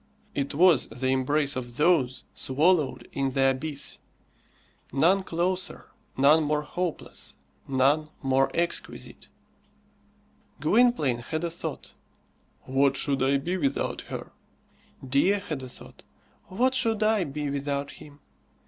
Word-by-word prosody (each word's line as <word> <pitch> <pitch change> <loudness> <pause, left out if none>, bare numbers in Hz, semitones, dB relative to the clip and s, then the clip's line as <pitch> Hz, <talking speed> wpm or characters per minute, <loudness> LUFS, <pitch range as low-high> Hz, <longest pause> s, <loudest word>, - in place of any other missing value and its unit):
It 140 0 -2
was 170 -3 +5
the 130 +1 -3
embrace 140 +2 +1
of 120 -2 -6
those 150 -6 +2
swallowed 150 +2 +1
in 135 -1 -1
the 135 0 +3
abyss; 140 +2 -4 0.9
none 170 +9 +3
closer, 185 +1 -2 0.3
none 145 +4 +6
more 150 0 0
hopeless, 175 +2 -5 0.3
none 140 +4 +2
more 135 0 +2
exquisite. 170 0 -3 1.3
Gwynplaine 155 - +3
had 155 +7 -4
a 170 - -1
thought 170 - -6 0.7
"What 135 +1 +2
should 140 -1 0
I 135 +1 +3
be 175 +7 -2
without 140 -5 -1
her?" - - -6 0.8
Dea 140 +6 +3
had 185 -9 -4
a 130 - -8
thought - - -12 0.4
"What 250 +7 +1
should 225 -5 +1
I 215 -2 +3
be 145 -1 -4
without 140 0 -2
him?" 145 -1 -14
145 Hz, 120 wpm, -27 LUFS, 135-175 Hz, 1.3 s, none